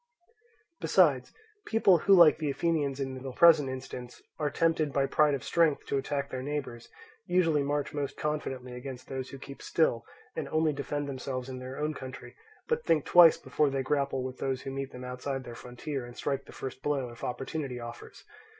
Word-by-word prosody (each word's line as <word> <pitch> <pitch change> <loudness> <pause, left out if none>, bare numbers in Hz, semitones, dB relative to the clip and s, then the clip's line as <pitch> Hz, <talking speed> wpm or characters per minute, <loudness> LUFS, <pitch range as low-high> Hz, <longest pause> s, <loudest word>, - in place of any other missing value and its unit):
Besides, - - +3 0.4
people 195 -6 +4
who, 195 +5 +5
like 170 -4 +7
the 155 -2 -1
Athenians 140 -2 0
in 130 -1 -4
the 135 0 -5
present 155 -3 +6
instance, 130 -1 -7 0.2
are 150 -1 +1
tempted 160 0 +1
by 135 0 +2
pride 150 +1 +3
of 135 - -6
strength 165 -4 +2
to 140 - -1
attack 140 0 -3
their 130 - -3
neighbours, 135 -4 -5 0.4
usually 165 -5 +3
march 145 +2 -1
most 145 -2 -3
confidently 135 -4 -3
against 125 0 -8
those 130 -1 -4
who 135 - -8
keep 140 +1 -10
still, 140 -8 +1 0.3
and - - -4
only 155 -1 +2
defend 145 +1 -3
themselves 130 -1 -4
in 130 -1 -6
their 130 +1 -7
own 150 +1 -1
country, 130 -2 -9 0.3
but 470 0 0
think 155 -3 +2
twice 175 -2 +8
before 150 -2 +1
they 135 -1 -1
grapple 140 -1 0
with 130 0 -6
those 135 -1 -2
who 135 - -5
meet 135 0 -4
them 125 - -9
outside 130 +1 -4
their 120 - -8
frontier 125 +3 -6
and 120 0 -11
strike 140 -1 -2
the - - -13
first 130 0 -7
blow 140 -3 -1
if 120 - -13
opportunity 135 0 -4
offers. 120 0 -9
140 Hz, 190 wpm, -29 LUFS, 130-150 Hz, 0.4 s, twice